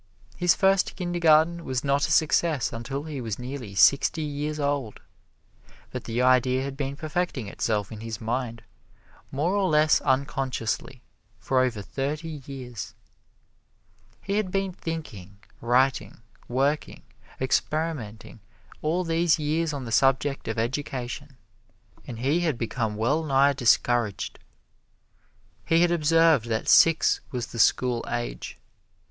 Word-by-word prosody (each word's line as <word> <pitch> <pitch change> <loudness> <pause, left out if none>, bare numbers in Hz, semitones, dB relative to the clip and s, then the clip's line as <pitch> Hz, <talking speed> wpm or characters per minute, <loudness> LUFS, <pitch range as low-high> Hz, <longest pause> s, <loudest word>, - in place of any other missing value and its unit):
His 175 -1 +3
first 195 -1 +2
Kindergarten 170 -2 +2
was 130 -3 -2
not 140 +1 +1
a - - -4
success 160 -3 +2
until 130 +5 -4
he 150 -4 -6
was 110 -4 -4
nearly 125 -5 -7
sixty 140 +8 +4
years 150 +1 -3
old, 140 -6 -2 0.9
but - - -6
the 120 +2 -1
idea 130 0 +3
had 135 0 -5
been 135 0 -3
perfecting 155 - -3
itself 105 0 -2
in 110 - -7
his 110 -1 -6
mind 115 0 -3 0.7
more 155 +7 0
or 195 -2 +1
less 150 0 +4
unconsciously 130 -2 -2 0.3
for 130 +3 0
over 120 -5 0
thirty 150 - -4
years. 125 -8 -7 1.3
He 200 +1 -1
had 210 -3 0
been 195 0 -1
thinking, 120 - -7 0.2
writing, 125 -1 +1 0.2
working, 140 +5 -1 0.4
experimenting 130 -6 -2 0.4
all 165 +4 0
these 165 0 +2
years 155 +1 -1
on 140 -3 -5
the 115 - -6
subject 135 +2 +2
of 110 - -3
education, 130 +2 -4 0.7
and 120 - -6
he 140 +8 +1
had 160 -7 0
become 115 -2 -2
well 125 +9 +1
nigh 140 -1 +3
discouraged. 120 -4 +1 1.2
He 165 +1 +3
had 175 - +3
observed 165 -5 +3
that 110 0 -2
six 165 -1 +5
was 125 -2 -3
the 115 - -8
"school 120 +1 +2
age." - - -4
135 Hz, 130 wpm, -26 LUFS, 120-155 Hz, 1.3 s, six